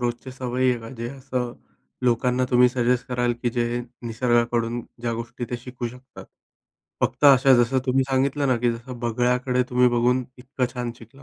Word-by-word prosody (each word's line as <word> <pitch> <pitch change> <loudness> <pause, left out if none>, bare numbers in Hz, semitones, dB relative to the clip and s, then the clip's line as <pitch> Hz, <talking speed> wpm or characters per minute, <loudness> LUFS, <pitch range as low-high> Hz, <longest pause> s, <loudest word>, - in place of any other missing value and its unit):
रोजचे 120 +2 -3
सवयी 130 0 -1
आहेत 120 - -1
का, 115 - -9
जे 120 -2 -5
असं 130 -3 -4 0.5
लोकांना 125 +1 +2
तुम्ही 125 0 +6
सजेस्ट 125 0 0
कराल, 120 -1 +1
की 120 - +1
जे 120 0 -1 0.3
निसर्गाकडून 120 0 +1 0.2
ज्या 115 -1 -1
गोष्टी 115 +1 -5
त्या 120 - -4
शिकू 125 -1 -5
शकतात? 125 +2 -13 0.8
फक्त - - 0
अशा 135 -1 +7
जसं 130 +3 +1
तुम्ही 130 +1 +2
सांगितलं 135 +1 +1
ना, 125 - +3
की 120 0 +1
जसं 120 +1 -8
बगळ्याकडे 125 +2 +1
तुम्ही 125 0 +4
बघून 125 +1 +2
इतकं 130 0 -2
छान 120 -1 -3
शिकला, 120 +5 -16
125 Hz, 170 wpm, -24 LUFS, 120-130 Hz, 0.8 s, अशा